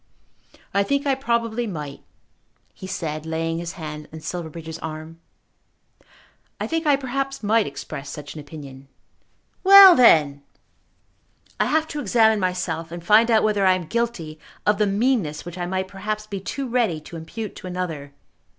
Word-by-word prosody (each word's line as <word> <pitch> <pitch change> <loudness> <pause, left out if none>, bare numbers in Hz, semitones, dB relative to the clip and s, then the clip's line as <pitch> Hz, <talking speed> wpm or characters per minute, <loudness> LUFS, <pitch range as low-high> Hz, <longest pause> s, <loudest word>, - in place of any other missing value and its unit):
"I 200 - +3
think 280 +7 0
I 275 - +3
probably 235 -3 -1
might," 150 -7 -6 0.7
he 190 - -9
said, 155 -4 -4
laying 165 +1 -2
his 170 +1 -5
hand 150 -3 -7
on 160 - -8
Silverbridge's 160 -1 -6
arm. 160 +1 -7 1.4
"I - - -2
think 325 -1 -2
I 290 - +6
perhaps 275 0 -3
might 220 +1 +2
express 140 0 -7
such 145 -1 -8
an 155 - -8
opinion." 140 -3 -11 0.8
"Well 390 -1 +10
then!" 150 - +5 1.2
"I - - +3
have 315 +1 +1
to 295 - -4
examine 220 -3 +3
myself, 180 -3 -2
and 170 0 -8
find 220 +4 +5
out 220 -2 +4
whether 210 -2 +1
I 185 -1 +5
am 180 -2 -5
guilty 175 -7 -3 0.3
of 210 0 +2
the 210 - +3
meanness 200 - 0
which 175 +1 -8
I 175 - -2
might 190 +1 -2
perhaps 210 +2 -4
be 200 -2 -5
too 265 +8 -4
ready 230 -10 0
to 170 - -11
impute 200 +6 -7
to - - -8
another. 170 -6 -4
185 Hz, 160 wpm, -23 LUFS, 160-230 Hz, 1.4 s, Well